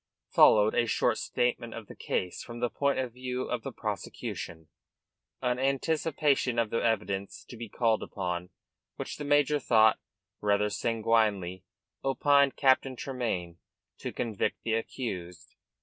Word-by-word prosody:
Followed 105 0 +6
a 120 - +2
short - - +1
statement 120 -1 -1
of 115 - -7
the - - -12
case 90 -1 -2
from 120 -1 -8
the 120 0 0
point 140 -1 +1
of 130 -3 -2
view 125 0 -3
of - - -3
the - - -5
prosecution, 80 -1 -5 0.8
an 125 0 +1
anticipation 140 -1 +1
of 115 -2 +1
the 115 - 0
evidence 100 -3 -1
to - - -9
be 115 -1 -7
called, 115 -1 +1
upon 90 -2 -4 0.5
which - - -5
the 150 - -5
major 145 0 +3
thought 110 -4 +4 0.4
rather 105 0 +2
sanguinely, 105 -6 +1 0.4
opined 140 0 +3
Captain 130 -1 +3
Tremayne 110 -11 -3 0.4
to - - -4
convict 110 -4 -2
the 115 - 0
accused. 100 -6 -4
115 Hz, 140 wpm, -29 LUFS, 105-130 Hz, 0.8 s, Followed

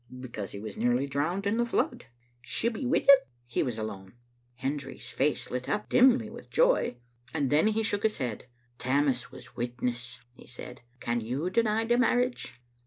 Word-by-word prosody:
" 125 - -9
Because 115 -6 -6
he 100 - -6
was 105 -1 -7
nearly 120 +3 +2
drowned 155 +8 -1
in 205 +3 +1
the 240 - +2
flood." - - 0 0.4
"She'll 230 - -1
be 250 +3 -3
wi' 265 - +3
him?" 275 -1 +8 0.2
" 120 - -39
He - - +3
was 120 -4 -1
alone. 100 -3 -6 0.2
" 120 0 -40
Hendry's 140 0 -3
face 145 +2 0
lit 125 0 -3
up 210 0 -1
dimly 250 -2 +5
with - - -11
joy, - - +3 0.4
and 140 -4 +1
then 155 +7 +5
he 220 +1 +1
shook 205 -2 0
his 220 -1 +1
head. 120 -6 -4 0.3
"Tammas 130 -1 +1
was 130 -1 -11
witness/' 125 0 -4
he - - -16
said. 125 0 -8 0.2
"Can 120 0 -1
you 135 +11 -2
deny 225 0 +2
the 240 +1 +3
marriage?" 245 +1 +1
135 Hz, 190 wpm, -29 LUFS, -, 0.4 s, him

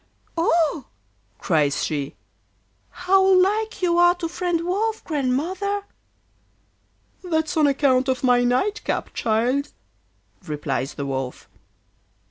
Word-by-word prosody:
'Oh!' 330 -3 +1 0.5
cries 150 -4 +1
she, 145 -3 -3 0.7
'how 380 +2 +2
like 390 +3 +2
you 345 -1 +3
are 350 0 +5
to 350 -2 -4
friend 345 0 -1
Wolf, 430 +5 -1
Grandmother!' 335 +9 -1 1.4
'That's 320 -3 -1
on 310 -2 +4
account 270 -2 +2
of 260 0 -1
my 245 -1 +4
night 260 +13 0
cap, - - -3
child,' 245 +6 0 0.8
replies 145 -2 -3
the 140 - -4
Wolf. 130 -2 -4
315 Hz, 105 wpm, -23 LUFS, 245-365 Hz, 1.4 s, are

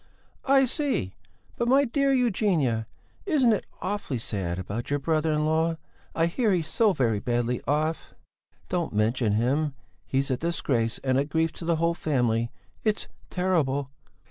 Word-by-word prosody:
"I 270 0 +5
see! 260 - -1 0.4
But, 235 - 0
my 275 +3 +5
dear 275 +2 +1
Eugenia, 185 - +1 0.4
isn't 270 - +4
it 210 - -2 0.2
awfully 195 -9 -2
sad 95 -6 -3
about 100 +6 -4
your 145 - +1
brother 155 +2 +1
in 150 0 +1
law? 160 +1 +1 0.4
I 165 - +3
hear 215 +6 +1
he's 170 -3 0
so 215 +5 +3
very 120 - +1
badly 120 0 -1
off." 155 +3 -1 0.5
"Don't 175 -7 -2
mention 110 +1 +1
him! 135 +6 +1 0.3
He's 135 +1 0
a 130 - +1
disgrace 125 -8 0
and 130 -1 +2
a 140 - +1
grief 160 +2 0
to 165 - -9
the 170 0 +2
whole 165 +1 +1
family! 120 -8 0 0.3
It's 215 -2 0 0.2
terrible!" 145 -7 0
155 Hz, 155 wpm, -26 LUFS, 125-185 Hz, 0.5 s, I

